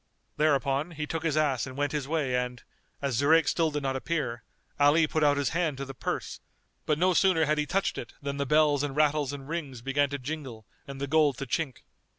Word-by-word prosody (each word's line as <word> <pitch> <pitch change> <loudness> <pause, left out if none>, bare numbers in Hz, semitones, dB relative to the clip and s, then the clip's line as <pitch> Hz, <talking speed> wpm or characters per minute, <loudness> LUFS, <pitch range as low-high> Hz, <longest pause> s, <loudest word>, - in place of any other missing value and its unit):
Thereupon, 140 0 +1
he 150 - -2
took 165 +1 -3
his 160 -2 0
ass 135 -7 +1
and 130 +1 -9
went 145 0 0
his 145 -3 -2
way 145 -5 0
and, 125 0 -3 0.4
as 135 -4 0
Zurayk 160 +3 +4
still 165 -2 +2
did 145 -1 -3
not 135 -1 -1
appear, 130 -5 -2 0.4
Ali 145 +3 +5
put 155 0 -1
out 145 -1 +4
his 140 -2 +1
hand 165 -5 -1
to 140 - -4
the 135 - -8
purse; - - -4 0.5
but 150 - +2
no 185 +3 +3
sooner 175 -3 +4
had 155 +1 +1
he 150 - 0
touched 195 +1 0
it - - -8
than 140 0 -4
the 140 -1 -1
bells 150 -1 +4
and 145 -2 -3
rattles 150 -2 +2
and 140 -1 -8
rings 145 -7 -5
began 140 +2 +1
to 140 - -3
jingle 130 -5 -6 0.2
and 140 -1 -7
the 140 - -1
gold 145 -2 +3
to 140 - -4
chink. 135 0 -3
145 Hz, 225 wpm, -28 LUFS, 135-155 Hz, 0.5 s, Ali